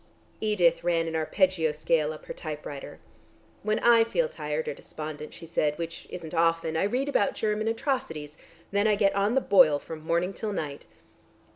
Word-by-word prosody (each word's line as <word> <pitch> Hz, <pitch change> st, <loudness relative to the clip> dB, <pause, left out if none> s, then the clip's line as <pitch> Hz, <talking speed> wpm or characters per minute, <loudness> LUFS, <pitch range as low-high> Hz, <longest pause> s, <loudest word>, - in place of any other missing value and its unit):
Edith 200 Hz, -6 st, +2 dB
ran 170 Hz, -1 st, +1 dB
an 165 Hz, -, -3 dB
arpeggio 160 Hz, 0 st, +2 dB
scale 155 Hz, 0 st, +1 dB
up 155 Hz, -, -10 dB
her -, -, -6 dB
typewriter. 150 Hz, -2 st, -7 dB, 0.6 s
"When 215 Hz, +1 st, 0 dB
I 235 Hz, -1 st, +6 dB
feel 485 Hz, -, 0 dB
tired 475 Hz, -1 st, -4 dB
or 475 Hz, -, -1 dB
despondent," 155 Hz, -, -8 dB
she 165 Hz, -, -10 dB
said, 150 Hz, -2 st, 0 dB
"which 170 Hz, 0 st, -6 dB
isn't 170 Hz, -3 st, -7 dB
often, 165 Hz, -1 st, +2 dB
I 160 Hz, -, +2 dB
read 250 Hz, +7 st, 0 dB
about 280 Hz, -7 st, +1 dB
German 215 Hz, 0 st, -1 dB
atrocities. 225 Hz, -, -2 dB, 0.4 s
Then 200 Hz, +2 st, +2 dB
I 210 Hz, -, +4 dB
get 200 Hz, -1 st, +3 dB
on 200 Hz, +4 st, +1 dB
the 270 Hz, -, +4 dB
boil 175 Hz, -10 st, +6 dB
from 155 Hz, +2 st, -8 dB
morning 170 Hz, +4 st, 0 dB
till 210 Hz, 0 st, -4 dB
night." 145 Hz, -5 st, -5 dB
175 Hz, 175 wpm, -27 LUFS, 155-215 Hz, 0.6 s, I